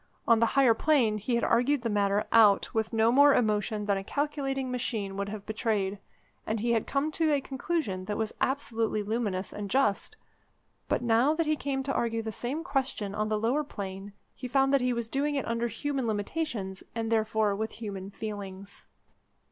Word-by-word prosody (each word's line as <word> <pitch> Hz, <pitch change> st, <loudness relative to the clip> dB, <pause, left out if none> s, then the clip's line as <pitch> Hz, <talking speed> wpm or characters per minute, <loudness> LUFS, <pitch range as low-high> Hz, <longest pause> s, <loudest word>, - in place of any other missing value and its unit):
On 230 Hz, -1 st, +5 dB
the 230 Hz, -, +4 dB
higher 260 Hz, -4 st, +6 dB
plane 230 Hz, -5 st, +2 dB
he 235 Hz, +4 st, -1 dB
had 235 Hz, -, 0 dB
argued 250 Hz, +2 st, +2 dB
the -, -, 0 dB
matter 205 Hz, -1 st, +1 dB
out 210 Hz, -3 st, +5 dB
with 220 Hz, -1 st, 0 dB
no 225 Hz, 0 st, +3 dB
more 285 Hz, +2 st, +6 dB
emotion 210 Hz, -1 st, 0 dB
than 200 Hz, -1 st, +1 dB
a 195 Hz, -, -4 dB
calculating 270 Hz, 0 st, -2 dB
machine 220 Hz, -6 st, -3 dB
would 200 Hz, 0 st, -3 dB
have 210 Hz, -1 st, -7 dB
betrayed, 210 Hz, -3 st, -1 dB, 0.5 s
and 220 Hz, 0 st, -1 dB
he 235 Hz, +2 st, 0 dB
had 225 Hz, -2 st, +1 dB
come 285 Hz, +3 st, 0 dB
to 315 Hz, 0 st, +1 dB
a 290 Hz, -, +3 dB
conclusion 265 Hz, -, -3 dB
that 210 Hz, +1 st, -3 dB
was 220 Hz, -1 st, -2 dB
absolutely 225 Hz, -5 st, 0 dB
luminous 205 Hz, -3 st, -2 dB
and 205 Hz, -1 st, -5 dB
just: 260 Hz, -, +1 dB, 0.7 s
but -, -, 0 dB
now 240 Hz, +6 st, +3 dB
that 330 Hz, 0 st, 0 dB
he 310 Hz, 0 st, +2 dB
came 275 Hz, -2 st, -2 dB
to 275 Hz, 0 st, -2 dB
argue 230 Hz, -1 st, -1 dB
the 220 Hz, -, -4 dB
same 260 Hz, +9 st, -3 dB
question 265 Hz, -, -2 dB
on 215 Hz, +1 st, -1 dB
the 215 Hz, -, +1 dB
lower 240 Hz, +8 st, +1 dB
plane 195 Hz, -5 st, -7 dB, 0.2 s
he 255 Hz, -, -7 dB
found 270 Hz, +2 st, +2 dB
that 275 Hz, -, +4 dB
he 250 Hz, 0 st, +1 dB
was 235 Hz, -2 st, -2 dB
doing 285 Hz, +4 st, -1 dB
it 275 Hz, -, -2 dB
under 230 Hz, +1 st, 0 dB
human 265 Hz, +3 st, -2 dB
limitations, 205 Hz, -3 st, -3 dB
and 225 Hz, -1 st, -2 dB
therefore 220 Hz, -2 st, +1 dB
with 220 Hz, +2 st, -3 dB
human 200 Hz, -4 st, -6 dB
feelings. 200 Hz, -2 st, -7 dB
225 Hz, 195 wpm, -29 LUFS, 210-270 Hz, 0.7 s, higher